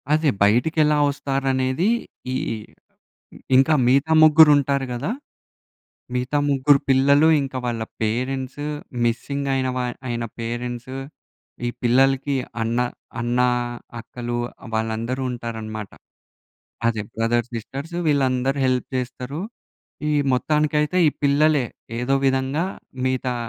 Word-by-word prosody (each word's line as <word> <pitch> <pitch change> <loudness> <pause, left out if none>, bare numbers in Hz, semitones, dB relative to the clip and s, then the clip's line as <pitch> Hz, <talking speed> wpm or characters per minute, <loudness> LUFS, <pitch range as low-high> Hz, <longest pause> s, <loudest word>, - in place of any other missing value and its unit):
అదే. 155 -1 +3
బయటికెలా 150 +8 +3
వస్తారనేది 135 +2 0 0.5
ఈ - - -1 1.2
ఇంకా 135 +4 +5
మిగతా 140 +5 +3
ముగ్గురు 155 0 +8
ఉంటారు 140 -1 0
గదా! 120 +10 -3 1.0
మిగతా 125 +4 0
ముగ్గురు 140 0 +4
పిల్లలు 140 +4 +5
ఇంకా 135 -1 -4
వాళ్ళ 115 -2 -2 0.2
పేరెంట్సూ 130 +5 -2 0.4
మిస్సింగ్ 140 +4 -1
అయిన 130 -1 0
వ - - 0 0.3
అయిన 120 -1 -2 0.2
పేరెంట్సు. 120 +2 -4 0.7
ఈ - - +1
పిల్లలకి 135 +3 +3 0.3
అన్న, 115 +1 -1 0.4
అన్న, 120 +1 0 0.6
అక్కలు 120 0 -5 0.4
వాళ్ళందరూ 115 +4 -2
ఉంటారన్నమాట. 110 -3 -6 1.0
అదే 110 -2 0
బ్రదర్, 115 +1 +1
సిస్టర్స్ 135 +8 -6
వీళ్ళందరూ 135 -2 +1
హెల్ప్ 125 -1 0
చేస్తారు. 125 +3 -5 0.7
ఈ - - +1 0.2
మొత్తానికైతే 150 +4 +1
ఈ - - +5
పిల్లలే 145 -1 +3 0.3
ఏదో 130 +3 +1
విధంగా 135 +4 +1 0.4
మిగతా 130 -1 0
130 Hz, 100 wpm, -22 LUFS, 120-140 Hz, 1.2 s, ముగ్గురు